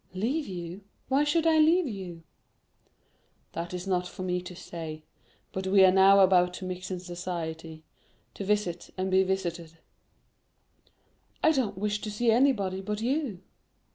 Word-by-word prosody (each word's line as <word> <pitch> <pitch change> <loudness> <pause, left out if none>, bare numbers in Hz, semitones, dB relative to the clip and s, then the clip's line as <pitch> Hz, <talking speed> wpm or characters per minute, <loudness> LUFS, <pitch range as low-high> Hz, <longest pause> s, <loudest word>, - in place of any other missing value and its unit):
"Leave 265 +11 -1
you? 175 0 -6 0.3
Why 275 +2 +3
should 320 +2 +1
I 320 -1 +4
leave 330 +3 +5
you?" 185 -7 -7 1.3
"That 170 +1 -4
is 180 0 -5
not 180 -2 0
for 185 - -8
me 180 -1 -1
to 180 0 -9
say; 160 -3 -7 0.5
but 190 0 -4
we 190 0 +6
are 185 - +6
now 195 +1 +6
about 180 -1 +4
to 185 - -7
mix 185 0 -5
in 185 -1 -3
society—to 170 -1 -8
visit 195 -4 -1
and 190 0 -1
be 190 0 +5
visited." 175 -4 -3 1.7
"I 315 - +6
don't 240 - -1
wish 210 +1 -1
to 215 - -4
see 225 +3 +1
anybody 220 -7 +2
but 210 +2 -3
you." 240 - -2
190 Hz, 150 wpm, -28 LUFS, 180-210 Hz, 1.7 s, we